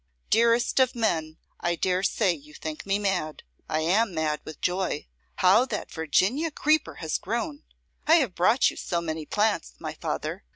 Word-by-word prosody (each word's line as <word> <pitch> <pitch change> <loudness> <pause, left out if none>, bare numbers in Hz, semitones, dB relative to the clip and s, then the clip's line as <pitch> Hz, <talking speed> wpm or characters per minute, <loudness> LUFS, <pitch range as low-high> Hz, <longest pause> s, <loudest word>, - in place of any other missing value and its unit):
Dearest 235 +3 +3
of 260 -1 +3
men, 160 -9 -1 0.2
I 175 0 0
dare 185 +2 0
say 195 -1 +2
you 150 -1 -13
think 155 +4 -6
me 195 0 +2
mad. 190 -7 -2 0.3
I 155 - 0
am 190 +4 +2
mad 155 -1 -1
with 155 - -9
joy. 180 -4 -1 0.3
How 185 +6 +5
that 220 -5 -5
Virginian 190 - +1
creeper 305 +1 +1
has 160 -2 -2
grown! 265 - -3 0.5
I 320 - +7
have 265 - +2
brought 215 +9 +3
you - - -12
so 175 - -2
many 160 -2 -4
plants, 210 - 0
my - - -5
father! - - -4
185 Hz, 170 wpm, -26 LUFS, 160-230 Hz, 0.5 s, I